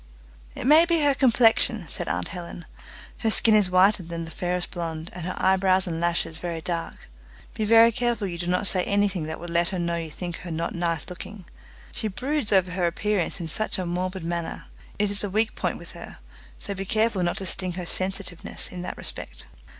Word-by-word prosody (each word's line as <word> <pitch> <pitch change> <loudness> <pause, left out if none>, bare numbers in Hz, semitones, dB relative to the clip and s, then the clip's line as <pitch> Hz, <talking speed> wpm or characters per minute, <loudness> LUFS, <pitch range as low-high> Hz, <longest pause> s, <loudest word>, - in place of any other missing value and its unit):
"It - - -4
may 310 +5 +7
be 335 -2 +2
her 285 -1 +4
complexion," 230 -5 +3
said - - -3
aunt 90 0 -2
Helen; 175 -1 -8 0.5
"her 225 - +1
skin 220 0 +5
is 210 -3 +5
whiter 185 +2 +5
than 170 -1 -6
the 165 - -9
fairest 180 +1 -2
blonde, 165 -2 -5
and 175 -1 -6
her 185 - -3
eyebrows 190 0 +3
and 165 -2 -3
lashes 170 -2 0
very 170 -1 -4
dark. 165 +1 -4 0.5
Be 215 - -2
very 230 +2 +7
careful 235 -2 -1
you 170 -3 -5
do 175 - -3
not 180 +3 +1
say 185 -2 +1
anything 200 -5 +1
that 160 0 -5
would 175 0 -7
let 170 0 +2
her 190 - -3
know 170 -1 -1
you 165 -1 -4
think 175 +2 -5
her 180 - -9
not 165 0 -3
nice 170 -2 -1
looking. 185 +1 -8 0.5
She 220 - -2
broods 255 +4 -1
over 185 -2 +3
her 180 -1 0
appearance 195 +1 -1
in 170 - -4
such 215 +7 -1
a 185 - -2
morbid 180 +1 -3
manner. 170 0 -4 0.3
It 205 0 +1
is 205 - +7
a 205 - -2
weak 215 +3 +1
point - - -2
with - - -10
her, - - -10 0.4
so 200 - -4
be 195 0 -4
careful 215 -1 +1
not 175 0 0
to 195 - -2
sting 185 0 -1
her 180 0 -5
sensitiveness 185 -1 -2
in 180 - -7
that 180 - -5
respect." - - -4
185 Hz, 210 wpm, -25 LUFS, 170-210 Hz, 0.5 s, may